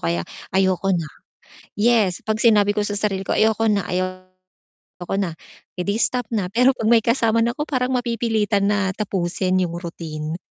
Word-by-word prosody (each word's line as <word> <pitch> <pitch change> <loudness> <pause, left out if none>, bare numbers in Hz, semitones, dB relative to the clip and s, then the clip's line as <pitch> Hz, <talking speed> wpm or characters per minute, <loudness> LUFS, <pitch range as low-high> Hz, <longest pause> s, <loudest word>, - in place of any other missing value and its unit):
kaya 85 0 0 0.3
ayoko 190 0 +2
na. 165 -3 -2 0.7
Yes 210 -4 +2
'pag 215 0 -1
sinabi 210 -3 +5
ko 210 - 0
sa 205 - -3
sarili 195 -2 -1
ko, - - 0
"Ayoko 220 0 +2
na. 200 -2 +1
Ayoko 185 0 -6 0.6
na." 190 -4 -1 0.5
Eh 180 - -1
'di 200 +3 -1
stop 245 -1 0
na, 205 -5 -1
pero 250 +5 +4
'pag 220 - -2
may 230 -2 +5
kasama 230 -1 +2
na 235 - +1
'ko 295 - -2
parang 255 -2 -1
mapipilitan 225 -4 0
na 205 -2 +1
tapusin 185 -2 -1
yung 175 -2 -1
routine. 160 -2 -6
205 Hz, 170 wpm, -21 LUFS, 185-225 Hz, 0.7 s, sinabi